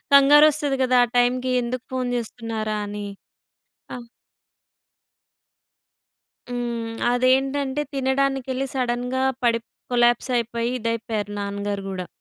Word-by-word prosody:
కంగారు 290 +2 +8
వస్తది 290 -2 -1
గదా! 255 -1 +4
ఆ - - -17
టైమ్‌కి 250 +1 +2
ఎందుకు 245 +1 -4
ఫోన్ 255 -1 -1
జేస్తున్నారా 225 -2 -4
అని? 205 0 -5 0.9
అ - - -4 2.5
హ్మ్. 235 -2 -3 0.2
అదేంటంటే, 265 +3 +1
తినడానికెళ్ళి 270 0 0
సడెన్‌గా 250 0 -1 0.2
పడిప్ 230 -1 +1 0.2
కొలాప్స్ 240 +2 +3
అయిపోయి, 235 +1 -2
ఇదైపోయారు 225 -2 -3
నాన్నగారు 200 0 -3
గూడా. 185 -2 -5
245 Hz, 100 wpm, -23 LUFS, 230-265 Hz, 2.5 s, కంగారు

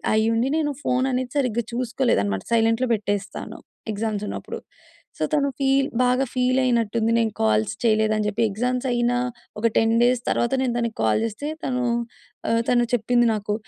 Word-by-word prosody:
అయ్యుండి 225 +3 +2
నేను 295 -2 0
ఫోన్ 255 +1 +1
అనేది 250 -1 -2
సరిగ్గా 240 -3 0
చూసుకోలేదు 245 - +1
అన్నమాట 100 -1 -2
సైలెంట్‌లో 225 +2 +2
పెట్టేస్తాను, 205 -1 -4 0.4
ఎగ్జామ్స్ 210 0 -2
ఉన్నప్పుడు. - - -6 0.6
సో, - - -2
తను 280 -2 +3
ఫీల్ 270 0 +2 0.2
బాగా 250 +2 +2
ఫీల్ 255 +1 +2
అయినట్టు 235 -3 +1
ఉంది 225 +1 +2
నేను 225 -2 0
కాల్స్ 110 - +2
చేయలేదు 215 -1 +3
అని 210 - -1
చెప్పి. 210 +2 -1
ఎగ్జామ్స్ 250 +4 -1
అయినా 240 0 +1 0.4
ఒక 230 - +4
10 225 0 +3
డేస్ 245 0 +3
తర్వాత 235 - +1
నేను 250 -2 0
తనకి 235 -2 -2
కాల్ 110 - +3
చేస్తే 230 +7 -4 0.2
తను 250 -1 -1 0.7
ఆహ్, 230 0 +2
తను 240 -1 +4
చెప్పింది 240 +1 +3
నాకు, 210 0 -2
235 Hz, 165 wpm, -23 LUFS, 215-250 Hz, 0.7 s, ఒక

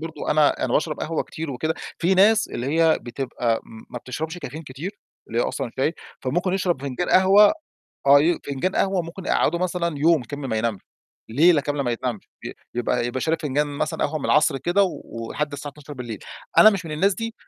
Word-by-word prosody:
برضه. 160 0 -5
أنا 150 -1 +3
أنا - - -2
باشرب 155 0 0
قهوة 160 0 -1
كتير 160 -1 -6
وكده. 155 +5 -2 0.2
في 180 +3 +2
ناس 215 +3 +5
اللي 120 - -4
هي 160 -1 +4
بتبقى 120 -2 -2
م 110 -1 -13
ما 120 - -5
بتشربش 155 +7 -5
الكافيين 160 -2 -7
كتير، 150 +9 -7 0.3
اللي 115 - -2
هي - - +3
أصلًا - - -3
هتلاقي 135 +7 -1 0.3
فممكن 175 +8 -1
يشرب 180 -7 0
فنجان 140 +6 -3
قهوة، 195 +3 +6 0.5
آه 140 +1 +8
ي 170 +2 +2
فنجان 145 +7 -2
قهوة 190 -2 +1
ممكن 170 +3 -9
يقعّده 170 - +2
مثلًا 170 -4 -1
يوم 160 -1 +4
كامل 140 +3 -6
ما 110 - -1
ينامش، 110 -3 -1 0.5
ليلة 155 +6 +5
كاملة 145 0 -2
ما 120 - -1
ينامش، 120 -2 -4 0.2
ي - - -5 0.2
يبقى 120 0 0
يبقى 125 +1 -3
شارب 160 0 0
فنجان 145 +1 0
مثلًا 145 -1 -2
قهوة 155 +2 -3
من - - -8
العصر 150 -2 +3
كده، 175 +9 +2
و 185 - -1 0.3
ولحد 150 +3 -3
الساعة 145 0 -6
00:00. 130 -7 -8 0.4
أنا 215 - +10
مش 195 -3 -3
من 155 - -5
الناس 190 +6 +2
دي، 225 +4 -5
150 Hz, 205 wpm, -23 LUFS, 130-175 Hz, 0.5 s, أنا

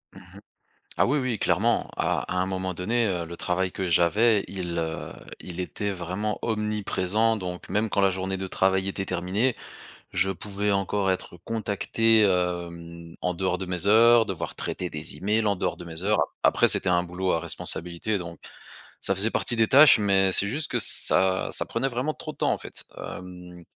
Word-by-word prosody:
Mmh - - -12
mh. - - -17 0.6
Ah - - +3
oui, 145 +4 0
oui, 130 -4 -3
clairement, - - -1
à - - -1
à - - -4
un 95 - -1
moment 95 -1 -4
donné 110 +7 -2
heu, 90 -4 -3
le 85 +1 -10
travail 95 +1 -2
que 95 +1 -5
j'avais, 100 +6 +1
il 90 -3 -6
heu, 80 -1 -5 0.3
il 90 0 -8
était 100 +3 -5
vraiment 95 +3 -5
omniprésent, 105 0 -2
donc 90 -3 -8
même 105 +1 -2
quand 100 - -1
la 100 - +3
journée 95 +1 -4
de 95 - -5
travail 95 +1 -1
était 95 0 -5
terminée, 95 +8 -2 0.6
je 95 +3 -1
pouvais 100 +2 -4
encore 100 0 -1
être 90 -1 -5
contacté, 115 0 0
hem 85 -3 -3
en 90 -1 -2
dehors 90 0 -3
de 95 - -6
mes 90 +2 -2
heures, 115 +2 +5
devoir 95 -5 -6
traiter 90 - -6
des 75 -1 -1
emails 105 +3 -1
en 100 -2 0
dehors 90 0 -3
de 85 - -11
mes 85 +2 -7
heures, 105 +1 +1 0.2
a - - +6
après - - +2
c'était - - +6
un 90 -1 +1
boulot 90 +1 -4
à 85 - -1
responsabilité 85 +4 -3
donc, 85 -2 -10 0.6
ça 100 - +3
faisait 105 +4 +4
partie 120 - 0
des 110 -1 +1
tâches 140 -2 +6
mais 95 -2 +1
c'est 100 +2 +5
juste 145 +7 -1
que - - -1
ça 95 0 +9
ça - - +4
prenait 130 +4 -3
vraiment 130 +4 -3
trop - - -9
de - - -24
temps - - 0
en - - -3
fait, - - -11 0.2
hem 90 -1 -11
95 Hz, 195 wpm, -24 LUFS, 90-105 Hz, 0.6 s, ça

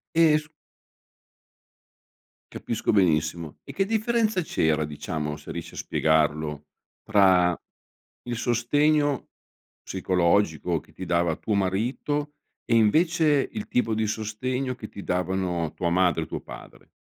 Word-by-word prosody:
Eh 165 -2 +6
s 150 0 -6 2.0
Capisco 115 0 -2
benissimo. 80 -4 +1
E - - -9
che 195 - +1
differenza 220 -1 +1
c'era, 80 - +1
diciamo, 75 0 -4
se 75 - -10
riesci - - -7
a - - -11
spiegarlo, 75 -1 0 0.4
tra 95 -4 +4 0.7
il 120 -1 -4
sostegno 145 +5 +1 0.5
psicologico 90 -3 +1
che - - -22
ti 95 - -8
dava 85 -1 +1
tuo 110 - -2
marito 120 +10 -1 0.3
e 115 - +2
invece 150 +5 +3
il 215 -1 -5
tipo 115 -2 +1
di 110 0 0
sostegno 125 +5 -2
che 110 -3 -9
ti 100 - -9
davano 90 -3 -1
tua 85 - -1
madre 90 -2 +2
e - - -7
tuo - - -5
padre? - - -12
100 Hz, 125 wpm, -25 LUFS, 85-135 Hz, 2.0 s, Eh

